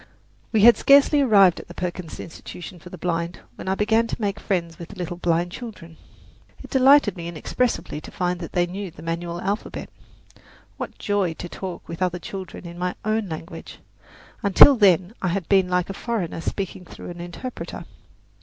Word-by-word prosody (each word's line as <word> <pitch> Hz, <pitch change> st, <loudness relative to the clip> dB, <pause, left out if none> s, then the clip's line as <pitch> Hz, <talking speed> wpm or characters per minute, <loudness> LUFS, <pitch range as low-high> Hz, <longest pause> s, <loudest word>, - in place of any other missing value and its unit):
We 220 Hz, -, +3 dB
had 235 Hz, +2 st, +8 dB
scarcely 285 Hz, +1 st, +6 dB
arrived 200 Hz, -9 st, +5 dB
at -, -, -11 dB
the 175 Hz, -, -11 dB
Perkins 180 Hz, -2 st, -5 dB
Institution 175 Hz, +2 st, -9 dB
for 180 Hz, -, -12 dB
the 185 Hz, -, -9 dB
Blind 170 Hz, 0 st, -2 dB
when -, -, -10 dB
I 190 Hz, -, +1 dB
began 220 Hz, +3 st, +2 dB
to -, -, -4 dB
make 205 Hz, -1 st, -1 dB
friends 170 Hz, -4 st, -2 dB
with 170 Hz, -, -7 dB
the 205 Hz, -, -10 dB
little 175 Hz, -2 st, -5 dB
blind 175 Hz, 0 st, 0 dB
children. 185 Hz, -7 st, -9 dB, 0.7 s
It -, -, -12 dB
delighted 265 Hz, -5 st, +5 dB
me 170 Hz, -2 st, -6 dB
inexpressibly 170 Hz, +1 st, -2 dB
to -, -, -10 dB
find 180 Hz, -1 st, -2 dB
that 165 Hz, -, -7 dB
they 175 Hz, -1 st, +3 dB
knew 190 Hz, +2 st, -5 dB
the 160 Hz, -1 st, -13 dB
manual 170 Hz, +1 st, -3 dB
alphabet. 200 Hz, +4 st, -4 dB, 0.9 s
What -, -, -6 dB
joy 200 Hz, -5 st, 0 dB
to 175 Hz, -, -6 dB
talk 180 Hz, 0 st, -7 dB
with 170 Hz, +2 st, -7 dB
other 180 Hz, -1 st, +1 dB
children 185 Hz, +1 st, -8 dB
in 170 Hz, 0 st, -8 dB
my 180 Hz, 0 st, -1 dB
own 215 Hz, -2 st, 0 dB
language! 160 Hz, +2 st, -8 dB, 0.6 s
Until 215 Hz, +7 st, +8 dB
then 190 Hz, -3 st, +4 dB
I 190 Hz, -, 0 dB
had 180 Hz, 0 st, -1 dB
been 190 Hz, -2 st, +4 dB
like 180 Hz, 0 st, +1 dB
a 195 Hz, -, -5 dB
foreigner 200 Hz, -7 st, -3 dB
speaking 190 Hz, 0 st, -4 dB
through 175 Hz, -, -9 dB
an 175 Hz, 0 st, -8 dB
interpreter. 175 Hz, +9 st, -7 dB
180 Hz, 185 wpm, -23 LUFS, 170-205 Hz, 0.9 s, had